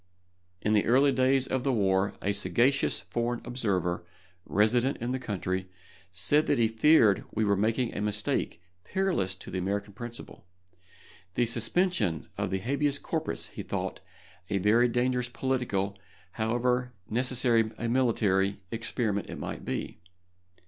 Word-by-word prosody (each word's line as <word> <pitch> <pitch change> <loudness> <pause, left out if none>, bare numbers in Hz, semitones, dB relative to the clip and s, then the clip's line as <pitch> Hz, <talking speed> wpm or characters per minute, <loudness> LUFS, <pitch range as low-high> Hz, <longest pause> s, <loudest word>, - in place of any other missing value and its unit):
In 105 - +2
the 105 - +3
earlier 135 +4 +5
days 130 +1 +3
of 130 -1 -1
the 135 - +1
war 100 -3 +1
a 100 - +1
sagacious 125 +7 +2
foreign 120 0 -2
observer, 95 -8 -1 0.4
resident 120 +6 +2
in 120 +2 -3
the 130 - -1
country, 95 -5 -3 0.4
said 120 +12 +2
that 145 - +2
he 115 -1 +4
feared 115 -2 +4
we 110 0 0
were 100 -1 +3
making 115 +4 0
a - - -2
mistake 105 -4 -1 0.2
perilous 185 - 0
to 95 - -10
the 95 - -2
American 100 +2 -2
principle. 120 -5 -9 0.9
The 120 - +3
suspension 115 - 0
of - - -2
the 95 - 0
habeas 140 +7 0
corpus - - -3
he - - -7
thought - - -4 0.5
a 100 - +1
very 110 +5 +4
dangerous 125 +1 0
political, 115 -7 -1 0.3
however 125 +3 0
necessary 120 -1 +2
a 115 - -2
military, 105 -6 +2
experiment 110 -2 -2
it - - -6
might - - -6
be. - - -4
115 Hz, 140 wpm, -28 LUFS, 100-125 Hz, 0.9 s, earlier